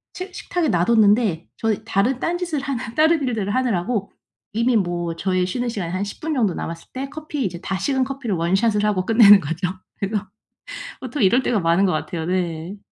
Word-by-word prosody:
식 370 Hz, 0 st, -7 dB
식탁에 350 Hz, -5 st, -2 dB
놔 175 Hz, -4 st, +2 dB
뒀는데 210 Hz, -6 st, +3 dB
저는 220 Hz, -1 st, -1 dB
다른 230 Hz, +5 st, +1 dB
딴 345 Hz, +4 st, -1 dB
짓을 330 Hz, -6 st, -2 dB
하는 250 Hz, -4 st, -4 dB
다른 315 Hz, +1 st, +4 dB
일들을 210 Hz, -4 st, -1 dB
하느라고 225 Hz, -4 st, 0 dB, 0.4 s
이미 235 Hz, +2 st, +2 dB
뭐 175 Hz, -4 st, -1 dB
저의 185 Hz, +1 st, 0 dB
쉬는 245 Hz, +6 st, -2 dB
시간이 190 Hz, -7 st, -4 dB
한 185 Hz, +2 st, -1 dB
10 200 Hz, -, -7 dB
분 315 Hz, 0 st, -2 dB
정도 220 Hz, -, +1 dB
남았을 165 Hz, 0 st, -6 dB
때 270 Hz, +1 st, -4 dB
커피 300 Hz, -3 st, -4 dB
이제 175 Hz, -3 st, -4 dB
다 190 Hz, -, -2 dB
식은 265 Hz, +6 st, +1 dB
커피를 265 Hz, -7 st, -3 dB
원샷을 200 Hz, +5 st, +1 dB
하고 185 Hz, -3 st, +1 dB
끝내는 215 Hz, -3 st, +8 dB
거죠. 165 Hz, +2 st, -2 dB, 0.3 s
그래서 205 Hz, 0 st, -2 dB, 0.7 s
보통 255 Hz, 0 st, -3 dB
이럴 240 Hz, +7 st, +4 dB
때가 235 Hz, -, +1 dB
많은 170 Hz, +4 st, +3 dB
것 190 Hz, -, +3 dB
같아요. 160 Hz, +1 st, -3 dB
네. 175 Hz, 0 st, -2 dB
210 Hz, 370 characters per minute, -22 LUFS, 185-255 Hz, 0.7 s, 끝내는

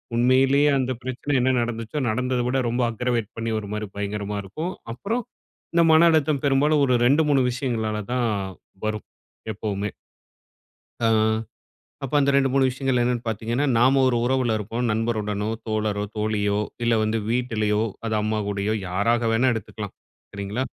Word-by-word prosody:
உண்மையிலேயே 135 Hz, +4 st, +4 dB
அந்த 130 Hz, 0 st, -1 dB
பிரச்சனை 130 Hz, +3 st, -3 dB
என்ன 130 Hz, +1 st, +3 dB
நடந்துச்சோ, 115 Hz, +4 st, -3 dB
நடந்தத 125 Hz, +2 st, 0 dB
விட 135 Hz, -, +1 dB
ரொம்ப 120 Hz, +2 st, 0 dB
அக்ரவேட் 120 Hz, -1 st, -1 dB
பண்ணி 115 Hz, 0 st, -2 dB
ஒருமாரி 105 Hz, 0 st, -5 dB
பயங்கரமா 105 Hz, 0 st, -3 dB
இருக்கும். 155 Hz, -, -5 dB, 0.2 s
அப்புறம் 225 Hz, -, -2 dB, 0.5 s
இந்த 170 Hz, -, +4 dB
மன 170 Hz, +2 st, +7 dB
அழுத்தம் 150 Hz, -3 st, +1 dB
பெரும்பாலும் 145 Hz, +2 st, +3 dB
ஒரு 125 Hz, -, +3 dB
2, 145 Hz, +4 st, +4 dB
3 140 Hz, -2 st, +4 dB
விஷயங்களால 115 Hz, -4 st, -2 dB, 0.2 s
தான் 120 Hz, -2 st, +1 dB, 0.6 s
வரும் 110 Hz, 0 st, -3 dB, 0.5 s
எப்பவுமே. 100 Hz, 0 st, -3 dB, 1.1 s
அ. 115 Hz, -, +2 dB, 1.0 s
அப்ப 135 Hz, -, -4 dB
அந்த 140 Hz, 0 st, +3 dB
2 135 Hz, -1 st, +4 dB
3 135 Hz, 0 st, +3 dB
விஷயங்கள் 130 Hz, 0 st, 0 dB
என்னென்னு 120 Hz, 0 st, 0 dB
பார்த்தீங்கன்னா, 115 Hz, +5 st, -1 dB
நாம 130 Hz, +3 st, +4 dB
ஒரு 125 Hz, -, +2 dB
உறவுல 125 Hz, -3 st, +1 dB
இருப்போம். 115 Hz, +4 st, -3 dB
நண்பருடனோ, 105 Hz, -2 st, -1 dB, 0.2 s
தோழரோ, 105 Hz, -2 st, -1 dB
தோழியோ, 105 Hz, -1 st, 0 dB, 0.2 s
இல்ல 115 Hz, -, +3 dB
வந்து 110 Hz, +1 st, 0 dB
வீட்டிலயோ, 110 Hz, -3 st, 0 dB, 0.2 s
அது 110 Hz, -, -1 dB
அம்மா 110 Hz, 0 st, 0 dB
கூடயோ 100 Hz, +1 st, -1 dB, 0.2 s
யாராக 115 Hz, +5 st, +1 dB
வேணா 125 Hz, +3 st, +3 dB
எடுத்துக்கலாம். 110 Hz, -2 st, -6 dB, 0.4 s
சரிங்களா. 100 Hz, +5 st, -3 dB
120 Hz, 145 wpm, -24 LUFS, 105-130 Hz, 1.1 s, மன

